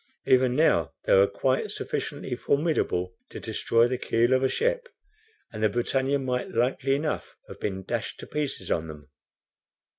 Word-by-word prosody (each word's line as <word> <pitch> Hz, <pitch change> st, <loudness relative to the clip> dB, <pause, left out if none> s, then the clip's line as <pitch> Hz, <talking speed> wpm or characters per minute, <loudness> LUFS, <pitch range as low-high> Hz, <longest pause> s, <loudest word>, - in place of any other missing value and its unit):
Even 130 Hz, -1 st, +4 dB
now 85 Hz, -, +3 dB
they -, -, +3 dB
were 100 Hz, +1 st, +6 dB
quite 130 Hz, +6 st, 0 dB
sufficiently -, -, -4 dB
formidable 140 Hz, -, 0 dB, 0.2 s
to -, -, -8 dB
destroy 115 Hz, +1 st, +2 dB
the 125 Hz, 0 st, -2 dB
keel 120 Hz, +1 st, +2 dB
of 130 Hz, -, +3 dB
a 130 Hz, -, +2 dB
ship, 485 Hz, +2 st, 0 dB, 0.6 s
and 110 Hz, -, -6 dB
the 110 Hz, -, +4 dB
BRITANNIA 130 Hz, +5 st, 0 dB
might 125 Hz, -2 st, -2 dB
likely 130 Hz, +3 st, +1 dB
enough 150 Hz, +2 st, -3 dB
have -, -, -11 dB
been 95 Hz, -2 st, -3 dB
dashed 115 Hz, +3 st, -3 dB
to -, -, -7 dB
pieces 145 Hz, -11 st, -3 dB
on 80 Hz, 0 st, 0 dB
them. 75 Hz, -2 st, -11 dB
125 Hz, 160 wpm, -27 LUFS, 100-135 Hz, 0.6 s, were